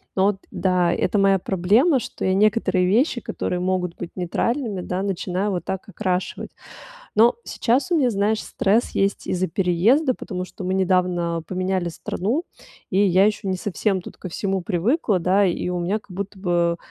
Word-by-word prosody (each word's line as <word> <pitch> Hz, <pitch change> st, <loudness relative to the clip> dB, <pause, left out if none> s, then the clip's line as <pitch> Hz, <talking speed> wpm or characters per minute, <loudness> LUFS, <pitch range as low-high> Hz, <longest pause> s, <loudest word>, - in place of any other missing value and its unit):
Но 190 Hz, -, +3 dB
вот 205 Hz, -1 st, +1 dB
да, 180 Hz, -2 st, +1 dB
это 185 Hz, +3 st, 0 dB
моя 195 Hz, -1 st, +4 dB
проблема, 210 Hz, -, +3 dB
что -, -, -5 dB
я 190 Hz, -, +2 dB
некоторые 195 Hz, -2 st, +2 dB
вещи, 240 Hz, -, +2 dB
которые 180 Hz, -, -3 dB
могут 180 Hz, -1 st, -1 dB
быть 175 Hz, -, -6 dB
нейтральными, 210 Hz, +4 st, -1 dB
да, 180 Hz, +1 st, -3 dB
начинаю 195 Hz, +1 st, -2 dB
вот 180 Hz, -2 st, -2 dB
так 190 Hz, -1 st, -5 dB
окрашивать. 185 Hz, -3 st, -3 dB, 0.7 s
Но 230 Hz, +2 st, +5 dB
сейчас 260 Hz, +10 st, 0 dB
у -, -, +4 dB
меня, 265 Hz, -6 st, +3 dB
знаешь, 210 Hz, +1 st, +1 dB
стресс 215 Hz, +5 st, +1 dB
есть 195 Hz, 0 st, -1 dB
из-за 185 Hz, 0 st, 0 dB
переезда, 195 Hz, -, +2 dB
потому 185 Hz, -6 st, -5 dB
что 185 Hz, -, -9 dB
мы 185 Hz, +1 st, -1 dB
недавно 180 Hz, -3 st, +1 dB
поменяли 185 Hz, -1 st, -1 dB
страну, 210 Hz, -, -2 dB, 0.5 s
и 190 Hz, -, +1 dB
я 190 Hz, +2 st, +5 dB
ещё 210 Hz, -2 st, -1 dB
не 190 Hz, -, 0 dB
совсем 195 Hz, +1 st, -1 dB
тут -, -, -11 dB
ко 185 Hz, -, -7 dB
всему 195 Hz, +2 st, -2 dB
привыкла, 195 Hz, -, +1 dB
да. 190 Hz, +4 st, +3 dB
И 175 Hz, 0 st, -1 dB
у 180 Hz, 0 st, -2 dB
меня 185 Hz, +5 st, -1 dB
как 210 Hz, -, -28 dB
будто 195 Hz, +2 st, -6 dB
бы 175 Hz, -2 st, +1 dB
190 Hz, 175 wpm, -22 LUFS, 180-210 Hz, 0.7 s, Но